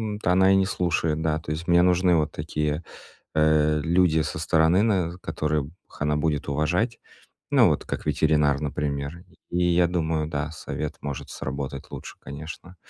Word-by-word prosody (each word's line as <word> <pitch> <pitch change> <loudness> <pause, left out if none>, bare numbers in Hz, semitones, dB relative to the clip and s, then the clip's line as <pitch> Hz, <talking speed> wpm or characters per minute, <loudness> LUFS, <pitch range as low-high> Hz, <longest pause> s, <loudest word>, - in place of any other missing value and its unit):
от 105 - -10
она 95 +2 +5
и - - +5
не 95 0 +3
слушает. 85 -4 0
Да, 80 -1 0
то 80 -2 -7
есть 80 +3 -4
мне 85 0 +5
нужны 90 0 +4
вот 75 -2 +1
такие, 75 +1 -2 0.5
э, 75 0 +3
люди 85 -1 +3
со 80 0 -3
стороны, 80 +3 +3
наверно, 90 -6 0
которых 75 -3 -2 0.3
она 75 0 +1
будет 75 -1 -1
уважать. 85 - 0 0.5
Ну, - - +6
вот - - -1
как - - -5
ветеринар, 75 -1 +2
например. 75 +2 -3 0.3
И 90 0 0
я 85 0 +4
думаю, 80 -3 -1
да, 75 0 -3
совет 75 -1 -5
может 70 -2 -5
сработать 70 0 -5
лучше, - - -8
конечно. 80 +6 -9
80 Hz, 165 wpm, -25 LUFS, 75-85 Hz, 0.5 s, Ну